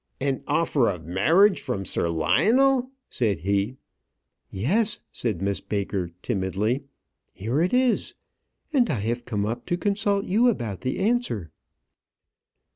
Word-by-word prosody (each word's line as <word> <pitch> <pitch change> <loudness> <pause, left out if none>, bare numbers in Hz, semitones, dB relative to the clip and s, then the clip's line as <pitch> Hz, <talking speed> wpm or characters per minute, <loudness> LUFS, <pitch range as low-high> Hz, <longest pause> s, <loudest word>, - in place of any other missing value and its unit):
"An 135 -1 -1
offer 145 -7 +2
of 90 -5 -5
marriage 160 - +4
from 100 0 -3
Sir 85 - +2
Lionel!" 235 - +3 0.2
said 105 - -1
he. 100 +6 0 0.7
"Yes," 205 - +1
said 105 -7 -3
Miss 100 0 -1
Baker, 100 -3 -2
timidly. 105 +5 -1 0.5
"Here 115 - -1
it 180 - +1
is; 250 -1 +1 0.6
and 250 -5 +3
I 110 - -1
have 120 +3 -2
come 105 -4 -1
up 120 +3 -4
to 175 - 0
consult 200 +1 0
you 230 +6 +3
about 115 - -3
the 130 0 -2
answer." 195 - 0
120 Hz, 130 wpm, -25 LUFS, -, 0.7 s, marriage